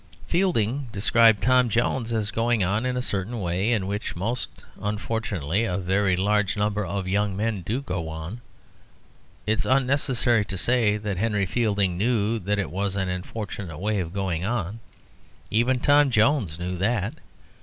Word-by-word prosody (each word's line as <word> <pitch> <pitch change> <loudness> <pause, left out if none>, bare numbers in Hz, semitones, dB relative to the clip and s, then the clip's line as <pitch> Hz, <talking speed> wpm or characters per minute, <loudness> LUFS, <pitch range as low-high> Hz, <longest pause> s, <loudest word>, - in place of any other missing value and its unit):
Fielding 145 - +1
described 110 +1 +4
Tom 125 -1 +4
Jones 115 +1 0
as 110 -3 -1
going 115 -1 +1
on 105 +7 0
in 125 0 -1
a 125 - -1
certain 105 +2 -2
way, 95 +4 0
in 105 -5 +1
which, 100 +2 -3
most 115 +8 -4 0.2
unfortunately, 105 - -1
a 95 -6 -1
very 95 0 +1
large 105 +2 +1
number 105 0 0
of 95 0 -3
young 100 0 0
men 105 -2 -1
do 110 +10 -2
go 90 -9 -3
on. 80 +9 -6 1.0
It 110 +1 +1
is - - 0
unnecessary 130 -4 +2
to 95 -1 -5
say 115 0 +2
that 105 -3 -3
Henry 105 -1 +1
Fielding 100 -4 0
knew 115 0 +1
that 105 +1 -1
it 100 - -2
was 100 +1 -2
an 95 -2 -1
unfortunate 90 -2 -5
way 105 +3 -1
of 85 -3 -3
going 95 -3 -2
on. 110 -1 -2 0.7
Even 120 +4 +2
Tom 145 +1 +5
Jones 110 - +2
knew 90 +1 -4
that. 105 +2 0
105 Hz, 165 wpm, -25 LUFS, 95-115 Hz, 1.0 s, Tom